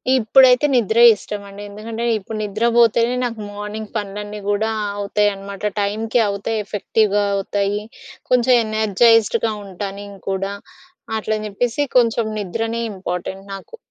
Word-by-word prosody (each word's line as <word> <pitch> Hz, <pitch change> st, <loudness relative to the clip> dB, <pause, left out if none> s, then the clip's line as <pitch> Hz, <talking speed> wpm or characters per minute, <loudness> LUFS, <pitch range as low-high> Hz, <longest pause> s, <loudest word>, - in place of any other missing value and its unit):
ఇప్పుడైతే 255 Hz, +3 st, +5 dB
నిద్రే 230 Hz, 0 st, +4 dB
ఇష్టమండి. 200 Hz, 0 st, -8 dB
ఎందుకంటే, 220 Hz, +3 st, -6 dB
ఇప్పుడు 215 Hz, +2 st, -7 dB
నిద్రబోతేనే, 230 Hz, +3 st, +2 dB
నాకు 230 Hz, -2 st, -4 dB
మార్నింగ్ 210 Hz, +1 st, -6 dB
పనులన్నీ 210 Hz, 0 st, -4 dB
గూడా 215 Hz, +2 st, +1 dB, 0.3 s
అవుతాయనమాట. 200 Hz, 0 st, -1 dB
టైమ్‌కి 220 Hz, +4 st, 0 dB
అవుతాయి, 200 Hz, +2 st, -2 dB
ఎఫెక్టివ్‍గా 205 Hz, 0 st, +1 dB
అవుతాయి. 200 Hz, +1 st, -1 dB, 0.5 s
కొంచం 250 Hz, 0 st, +4 dB
ఎనర్జైజ్డ్‌గా 220 Hz, +1 st, +3 dB
ఉంటా 195 Hz, +1 st, -5 dB
నేను 200 Hz, -1 st, -10 dB
కూడా. 195 Hz, +1 st, -2 dB, 0.6 s
అట్లని 215 Hz, 0 st, -2 dB
చెప్పేసి 235 Hz, +6 st, -1 dB, 0.2 s
కొంచం 230 Hz, -1 st, +3 dB
నిద్రనే 225 Hz, +4 st, -3 dB
ఇంపార్టెంట్ 190 Hz, 0 st, -5 dB
నాకు. 195 Hz, -, -9 dB
210 Hz, 110 wpm, -20 LUFS, 200-230 Hz, 0.6 s, ఇప్పుడైతే